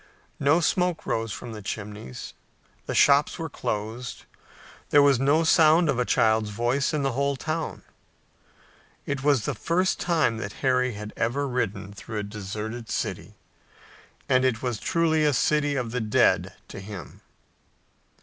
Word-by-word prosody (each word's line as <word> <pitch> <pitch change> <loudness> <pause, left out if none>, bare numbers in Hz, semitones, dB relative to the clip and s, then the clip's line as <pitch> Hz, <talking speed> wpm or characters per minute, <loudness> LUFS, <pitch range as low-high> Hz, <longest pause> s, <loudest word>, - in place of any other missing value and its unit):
No 145 +5 +3
smoke 180 0 0
rose 115 -1 -1
from 120 - -7
the 110 -1 -8
chimneys. 105 - -7 0.5
The - - -3
shops 140 +1 +4
were 160 -3 -5
closed. 110 +3 -4 0.6
There 145 - +6
was 140 -3 +4
no 145 +5 +3
sound 160 +1 +5
of 130 -3 +1
a 125 - +1
child's 110 -2 +2
voice 120 +6 0
in 150 -2 -1
the 135 - +1
whole 140 +2 0
town. 155 +3 -4 1.2
It 140 -2 -3
was 140 -7 +3
the - - -1
first 185 +3 0
time 160 -10 +1
that 105 -2 -5
Harry 125 -1 +2
had 105 +1 -8
ever 140 +5 -1
ridden 100 -6 -3
through 110 +2 -7
a 105 - -2
deserted 105 +3 -6
city, - - -4 0.9
and 130 0 +3
it 130 -3 0
was 120 -4 -2
truly 160 -2 +1
a 150 -1 +3
city 145 +3 +1
of 125 -4 -2
the 125 0 -2
dead 105 -1 +2
to - - -8
him. 100 -1 -9
125 Hz, 155 wpm, -25 LUFS, 110-145 Hz, 1.2 s, There